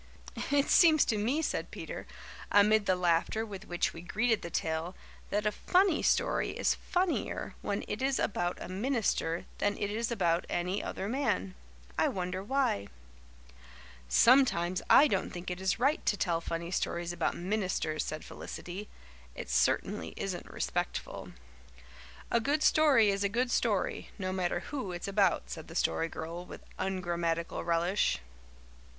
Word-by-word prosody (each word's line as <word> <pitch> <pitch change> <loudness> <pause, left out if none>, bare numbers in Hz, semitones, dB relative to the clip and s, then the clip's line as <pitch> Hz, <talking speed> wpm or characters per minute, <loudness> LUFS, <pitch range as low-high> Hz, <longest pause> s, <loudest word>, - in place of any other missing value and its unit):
"It 285 0 +3
seems 315 -4 +6
to 220 - 0
me," 260 +10 0
said - - -2
Peter, - - -7 0.4
amid 205 +1 +5
the 185 - +4
laughter 180 +5 +1
with 200 -1 -8
which 175 0 0
we 165 - -8
greeted 220 +5 +1
the 170 - -6
tale, 160 +2 -2 0.3
"that 210 +1 0
a 210 - +3
funny 365 - +2
story - - +1
is - - +2
funnier 360 -1 -1
when 200 - -2
it 210 - -4
is 270 0 +1
about 175 -3 -1
a - - -6
minister 195 -5 -1
than 205 0 +1
it 205 0 -2
is 230 +2 -2
about 175 -6 +1
any 180 +3 -1
other 195 - -4
man. 205 - -1 0.5
I - - +4
wonder 185 0 -3
why." 255 - 0 1.2
"Sometimes 185 - +4
I 295 - +8
don't 195 -7 0
think 180 +1 -6
it 180 +1 -5
is 190 +3 +1
right 275 +6 +1
to 205 - +3
tell 170 -3 0
funny 170 +1 -4
stories 175 -1 -1
about - - -1
ministers," 180 -5 -1
said 155 0 -5
Felicity. 190 +4 -7 0.5
"It - - -6
certainly - - +1
isn't - - -4
respectful." - - -3 1.0
"A 235 - +4
good 290 +6 0
story 270 -9 +5
is 200 0 -1
a 200 - +2
good 245 +4 0
story 215 -7 0
no 185 -2 -3
matter 180 -2 -1
who 260 -11 -5
it's 175 - -5
about," 195 - +2
said - - -7
the - - -10
Story 165 - +1
Girl 165 +3 -6
with - - -10 0.2
ungrammatical 175 -3 -1
relish. 170 - +1
195 Hz, 155 wpm, -31 LUFS, 175-230 Hz, 1.2 s, I